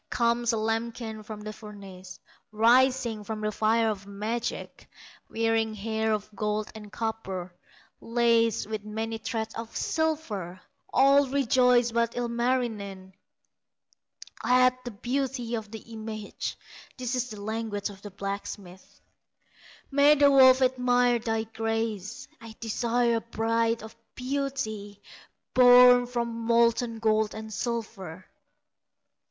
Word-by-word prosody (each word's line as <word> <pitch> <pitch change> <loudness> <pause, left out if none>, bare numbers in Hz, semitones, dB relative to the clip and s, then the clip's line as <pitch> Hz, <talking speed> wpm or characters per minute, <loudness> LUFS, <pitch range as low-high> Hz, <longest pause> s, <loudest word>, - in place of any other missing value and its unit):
Comes 235 0 +1
a 225 - -1
lambkin 225 0 -3
from 210 0 -8
the 215 0 -6
furnace, 195 -4 -11 0.3
Rising 235 0 +3
from 215 +1 -5
the 215 0 -1
fire 225 +2 +2
of 200 -2 -3
magic, 220 +4 -4 0.4
Wearing 225 -1 0
hair 220 +1 -1
of 210 -1 -1
gold 210 0 -2
and 210 -2 -11
copper, 195 -6 -4 0.5
Laced 230 -1 +2
with 215 0 -5
many 220 +1 -4
threads 220 -1 -4
of 230 0 -6
silver; 230 - -2 0.3
All 275 +1 +5
rejoice 250 -2 +3
but 235 0 0
Ilmarinen 235 -6 -2 1.3
At 255 0 +3
the - - -3
beauty 245 +2 -3
of 220 -2 -3
the 220 - -7 0.2
image. 215 -1 -6 0.4
This 250 0 -2
the 215 - -8
language 215 -1 -3
of 195 -1 -14
the 205 - -8
blacksmith: 195 -1 -7 0.9
"May 285 +2 +6
the 285 -1 +5
wolf 260 -1 +7
admire 245 -1 +2
thy 225 -1 -1
graces; 225 -2 -3
I 225 -1 -11
desire 235 +1 +1
a - - -3
bride 230 0 0
of 220 - -10 0.2
beauty 250 -7 -3 0.5
Born 245 0 +7
from 240 -1 -2
molten 230 0 +2
gold 220 -1 +1
and 220 0 -7
silver!" 200 -6 -5
225 Hz, 120 wpm, -27 LUFS, 215-245 Hz, 1.3 s, wolf